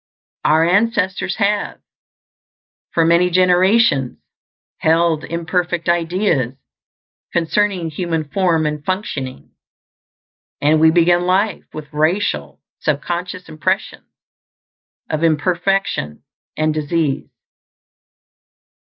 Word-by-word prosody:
Our 160 +2 +4
ancestors 195 -1 +1
have, 205 -1 -1 1.1
for 165 - +1
many 170 +2 +4
generations, 180 - +3 0.6
held 160 -1 +2
imperfect 170 +1 -2
ideas 170 - 0 0.8
concerning 175 0 0
human 165 0 -2
form 165 -1 +1
and 150 -1 -3
functioning; 150 -8 -4 1.1
and 155 +2 +3
we 160 - +7
begin 175 +1 +3
life 195 +4 +1
with 155 0 -9
racial 150 - 0 0.2
sub 145 -1 -1
conscious 180 +1 -4
impressions 185 +6 -3 1.0
of 155 +1 -2
imperfection 170 - 0 0.3
and 155 0 +1
disease. 155 -1 -1
170 Hz, 85 wpm, -18 LUFS, 155-185 Hz, 1.1 s, we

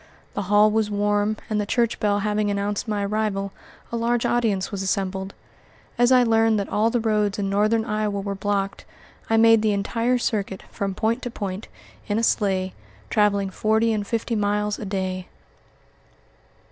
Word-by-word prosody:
The - - -2
hall 210 +1 +5
was 215 -1 +1
warm, 205 +1 +1
and 210 -1 0
the - - -2
church 235 0 +1
bell 205 -1 +1
having 210 0 0
announced 205 +2 -2
my 205 -2 -1
arrival, 200 -1 -1 0.4
a - - -2
large 235 0 0
audience 220 -6 +1
was 200 -2 -3
assembled. 190 0 -2 0.6
As 245 +1 +3
I 255 -1 +6
learned 225 -2 +3
that 200 - -3
all 215 +2 +2
the 240 - 0
roads 215 -2 +1
in 195 -1 -1
Northern 215 +2 +2
Iowa 210 -2 -1
were 200 0 -3
blocked, 195 0 -2 0.5
I 225 - +3
made 225 0 +6
the 215 -1 +2
entire 230 +5 0
circuit, 200 -5 -2
from 195 -1 -3
point 230 +5 0
to 245 - -4
point, 200 -3 -5 0.4
in 205 0 0
a 230 - 0
sleigh, 190 -4 +1 0.4
traveling 200 -2 +2
forty 220 +3 +2
and 205 -2 -2
fifty 230 0 -1
miles 210 0 0
a - - -5
day. 185 -2 -3
210 Hz, 170 wpm, -23 LUFS, 200-225 Hz, 0.6 s, I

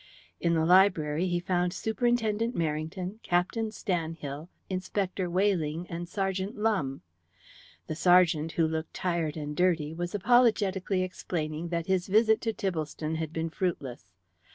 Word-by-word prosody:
In 170 -1 +1
the 160 -1 +2
library 180 -3 +4
he 175 -1 0
found 175 0 0
Superintendent 230 0 0
Merrington, 165 +5 -3
Captain 190 +6 0
Stanhill, 165 -6 -4 0.2
Inspector 185 0 -2
Weyling, 175 -3 +1
and 170 0 -5
Sergeant 195 +1 -2
Lumbe. 200 -12 0 0.8
The - - -4
sergeant, 165 -2 +4
who 165 -1 +2
looked 160 0 -4
tired 170 -4 -1
and 150 -1 -4
dirty, 165 -4 +1
was 175 +3 -4
apologetically 200 -4 +3
explaining 165 -3 -4
that 170 -1 -2
his 190 -1 0
visit 220 +2 +4
to 225 - 0
Tibblestone 160 -5 -3
had 160 -1 -3
been 165 0 -3
fruitless. 140 - -3
175 Hz, 130 wpm, -29 LUFS, 160-195 Hz, 0.8 s, library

